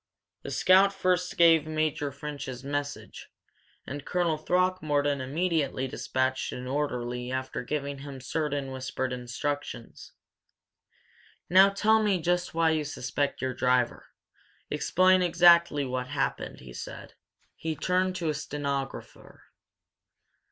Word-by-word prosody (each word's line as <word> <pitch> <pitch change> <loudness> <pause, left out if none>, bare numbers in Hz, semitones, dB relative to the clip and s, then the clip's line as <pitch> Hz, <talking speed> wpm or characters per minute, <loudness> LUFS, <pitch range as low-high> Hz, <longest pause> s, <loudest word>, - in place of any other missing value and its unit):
The - - -7
scout 190 +2 +5
first 180 -2 0
gave 165 -3 +5
Major 155 -2 -1
French's 140 -3 -7
message, 145 +1 -5 0.6
and 140 +1 -6
Colonel 175 -1 0
Throckmorton 155 -4 +1
immediately 145 -2 -1
dispatched 130 0 -1
an 125 - -6
orderly 125 -3 -2
after 130 0 -3
giving 140 +1 -3
him 140 -1 -8
certain 140 0 -2
whispered 130 0 -3
instructions. 125 +1 -5 1.4
"Now 190 +2 +8
tell 220 +2 +3
me 205 -4 +2
just 175 +1 -1
why 165 -1 +3
you 155 -1 0
suspect 140 -1 -3
your 130 -1 -1
driver. 125 -1 +1 0.6
Explain 185 +1 +3
exactly 170 -4 +5
what 125 -1 -3
happened," 145 +2 -3
he 60 -1 -11
said. - - -8 0.4
He 160 -1 -3
turned 185 +4 0
to 170 -3 -2
a - - +1
stenographer. 140 -2 -5
145 Hz, 115 wpm, -28 LUFS, 130-170 Hz, 1.4 s, Now